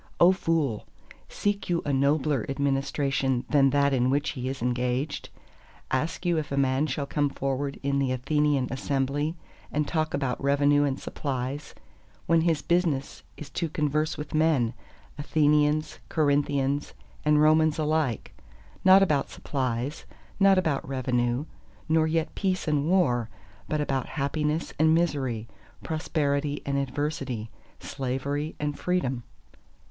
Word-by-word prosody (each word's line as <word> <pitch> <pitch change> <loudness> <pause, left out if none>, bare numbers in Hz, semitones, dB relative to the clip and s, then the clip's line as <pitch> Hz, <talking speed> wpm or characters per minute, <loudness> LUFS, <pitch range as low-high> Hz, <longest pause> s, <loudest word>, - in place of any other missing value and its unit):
O 175 +2 +7
fool, 165 - -1 0.4
seek 205 -2 -2
you 170 -1 +1
a 145 - 0
nobler 140 -1 +2
administration 135 -2 0
that 140 -2 +5
that 140 0 +2
in 125 -1 +2
which 145 +2 +1
he 130 -1 -4
is 135 0 -4
engaged? 125 +4 -1 0.6
Ask 155 +7 -1
you 170 -2 +2
if 150 - -6
a 140 - -1
man 135 +2 +2
shall 145 -2 -2
come 145 0 0
forward 140 +1 -3
in 140 0 +1
the 135 -2 +1
Athenian 140 +1 +1
assembly 140 +3 -1 0.4
and 150 0 0
talk 155 -2 -1
about 135 -2 -2
revenue 145 +1 +3
and 135 -1 -1
supplies, 135 +1 -4 0.5
when 165 -1 +4
his 160 -2 +1
business 165 -6 0 0.2
is 145 -2 -9
to 165 +4 -2
converse 150 0 0
with 150 0 -7
all 155 - +2
men, 140 -8 +2 0.5
Athenians, 150 0 +2
Corinthians, 145 -2 +1 0.3
and 150 0 +4
Romans 155 0 +4
alike, 155 -6 -1 0.5
not 190 +1 +8
about 145 - +1
supplies, 125 - -3 0.3
not 195 -1 +6
about 155 -7 0
revenue, 125 0 0 0.4
nor 160 0 +3
yet 160 0 -1
peace 185 -3 -1
and 150 0 +1
war, 125 -12 +2 0.4
but 155 - 0
about 135 -3 -1
Happiness 150 +2 -2
and 160 +1 +5
Misery, 135 -9 0 0.4
Prosperity 145 -2 -1
and 140 - -1
Adversity, 135 -5 -3 0.3
Slavery 140 +4 -3
and 145 -1 -3
Freedom? 135 -9 0
145 Hz, 135 wpm, -27 LUFS, 135-155 Hz, 0.6 s, not